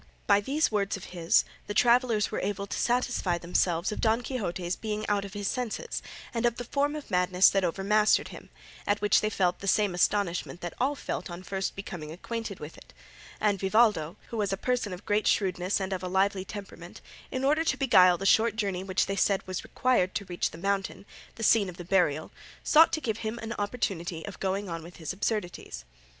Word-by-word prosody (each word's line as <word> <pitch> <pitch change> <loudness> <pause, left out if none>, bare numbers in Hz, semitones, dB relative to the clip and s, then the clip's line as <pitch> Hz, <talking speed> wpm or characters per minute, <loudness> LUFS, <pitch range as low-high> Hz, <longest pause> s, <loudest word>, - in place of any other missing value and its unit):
By 200 0 +4
these 290 +7 +1
words 200 -2 0
of 190 - -11
his 170 -1 +3 0.2
the 205 - -4
travellers 240 -3 +3
were - - -2
able 200 0 -2
to - - -5
satisfy 240 -7 +1
themselves 175 +2 0
of - - -4
Don 225 +2 +2
Quixote's 185 -8 -3
being 215 -1 -4
out 205 -1 +1
of 195 - -9
his 205 -1 -3
senses 250 -2 -3 0.3
and 230 -1 -1
of 235 - -1
the 245 - -5
form 285 +4 0
of 300 - -8
madness 180 0 +4
that 195 -1 +1
overmastered 200 +5 +2
him, - - -11 0.4
at 205 0 +2
which 210 0 +3
they 215 - 0
felt 180 -4 0
the 200 - -7
same 205 -1 +2
astonishment 180 -1 0
that 175 -1 -5
all 275 +3 +1
felt - - -5
on 175 +1 -8
first 195 0 -3
becoming 175 -6 -7
acquainted 225 +3 -5
with 150 +1 -9
it; - - -19 0.4
and 205 -2 +1
Vivaldo, 195 -5 +2
who 230 - -5
was 205 -2 0
a 195 - -1
person 245 -2 -1
of 180 +1 -8
great 210 +1 +1
shrewdness 185 -1 +1
and 190 0 -2
of 185 - -3
a 185 - -4
lively 190 +1 +1
temperament, 200 0 -9 0.3
in 260 0 -3
order 300 +4 +3
to - - 0
beguile 185 -9 +5
the 195 - -5
short 220 +2 +4
journey 195 -4 -2
which 190 0 +1
they 195 - -2
said 195 0 +1
was 185 0 -4
required 245 -8 +1
to 200 - -2
reach 175 -1 -1
the - - -11
mountain, 195 +2 -2 0.3
the 225 - -6
scene 210 -3 +4
of 180 - -10
the 175 - -8
burial, 170 -5 +1 0.3
sought 315 +2 +6
to 315 - -1
give 225 -5 -2
him 220 +1 -3
an 225 +1 -4
opportunity 190 -6 -2
of 200 - -8
going 195 +1 -1
on 165 -2 -4
with 170 +2 -12
his 160 0 -5
absurdities. 190 - -3
200 Hz, 210 wpm, -28 LUFS, 180-220 Hz, 0.4 s, sought